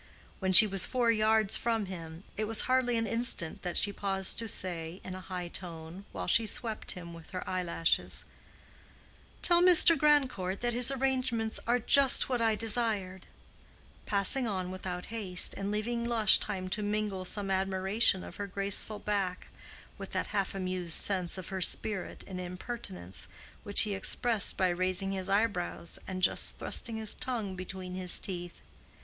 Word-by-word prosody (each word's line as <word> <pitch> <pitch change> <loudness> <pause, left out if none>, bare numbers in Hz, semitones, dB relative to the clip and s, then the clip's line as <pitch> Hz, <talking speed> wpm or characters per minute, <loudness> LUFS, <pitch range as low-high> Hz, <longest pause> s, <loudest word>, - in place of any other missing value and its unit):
When 190 -1 -1
she 190 +4 +11
was 195 -3 +1
four 245 -3 +1
yards 220 -1 +2
from 225 -3 -2
him, 165 -2 -9
it 215 - -3
was 220 0 +2
hardly 255 -2 0
an 225 - -1
instant 230 -7 0
that 175 -1 -4
she 205 - +4
paused 195 -1 -2
to 230 - -3
say 175 -3 -6
in 185 - -8
a 185 - -8
high 180 -2 -6
tone, 170 +1 -8
while - - -6
she 225 -1 +2
swept 220 0 0
him 170 -2 -10
with 165 -1 -13
her 185 -1 -7
eyelashes, 175 -3 -1 1.2
"Tell 345 -1 +5
Mr. 350 -2 +7
Grandcourt 265 -11 0
that 240 0 -1
his 245 +1 +3
arrangements 255 -4 -1
are 240 +1 +2
just 265 +3 +5
what 250 -2 -1
I 225 -1 +1
desired"—passing 210 +1 -1
on 185 -3 -4
without 180 -1 -6
haste, 190 -5 0
and 195 0 -5
leaving 230 +3 -3
Lush 230 -3 +5
time 190 -3 -5
to 210 - -2
mingle 205 -2 -3
some 195 +2 -1
admiration 190 +1 0
of - - -11
her 205 - -5
graceful 200 +2 -3
back 200 -3 -4 0.5
with - - -9
that - - -2
half 195 -1 -2
amused 185 -3 -3
sense 185 -3 +3
of 185 - -8
her 190 -1 -5
spirit 200 +2 -1
and 185 -2 -8
impertinence, 175 - -8 0.3
which 205 - +5
he 210 -2 0
expressed 215 +2 +2
by 185 -1 +1
raising 185 +2 -1
his 190 -1 -5
eyebrows 200 -5 -1
and 185 -1 -6
just - - +1
thrusting 225 -1 -2
his 220 -1 +1
tongue 225 -7 -5
between 185 0 -8
his 185 -1 +2
teeth. 175 -2 -6
195 Hz, 165 wpm, -29 LUFS, 185-225 Hz, 1.2 s, she